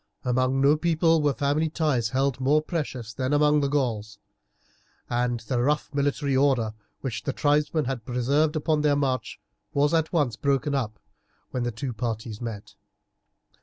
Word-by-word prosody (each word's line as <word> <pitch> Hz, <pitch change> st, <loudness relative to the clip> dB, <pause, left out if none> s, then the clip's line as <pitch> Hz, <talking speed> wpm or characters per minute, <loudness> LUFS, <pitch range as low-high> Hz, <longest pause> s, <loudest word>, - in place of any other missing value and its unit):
Among 130 Hz, +2 st, +1 dB
no 145 Hz, +2 st, +5 dB
people 165 Hz, 0 st, +2 dB
were 145 Hz, -1 st, +3 dB
family 145 Hz, +5 st, 0 dB
ties 150 Hz, -8 st, 0 dB
held 135 Hz, 0 st, 0 dB
more 145 Hz, +4 st, +3 dB
precious 130 Hz, -9 st, -4 dB
than 130 Hz, +5 st, -1 dB
among 150 Hz, 0 st, +4 dB
the 140 Hz, -, +1 dB
Gauls, 115 Hz, -7 st, -1 dB, 0.9 s
and 120 Hz, -1 st, 0 dB
the 120 Hz, +1 st, -1 dB
rough 150 Hz, +3 st, 0 dB
military 140 Hz, 0 st, 0 dB
order 130 Hz, -5 st, +2 dB, 0.3 s
which 125 Hz, -6 st, -3 dB
the 140 Hz, -, -2 dB
tribesmen 150 Hz, +2 st, +1 dB
had 125 Hz, -3 st, -3 dB
preserved 140 Hz, +6 st, +1 dB
upon 155 Hz, 0 st, +1 dB
their 150 Hz, -1 st, +3 dB
march 135 Hz, -3 st, -1 dB, 0.4 s
was 145 Hz, +2 st, +3 dB
at 160 Hz, -1 st, +1 dB
once 145 Hz, -, +1 dB
broken 140 Hz, +1 st, 0 dB
up 120 Hz, -6 st, -2 dB, 0.5 s
when 125 Hz, -, -2 dB
the 120 Hz, 0 st, -1 dB
two 120 Hz, +3 st, -4 dB
parties 110 Hz, -1 st, -4 dB
met. 110 Hz, -4 st, -6 dB
135 Hz, 160 wpm, -26 LUFS, 120-150 Hz, 0.9 s, no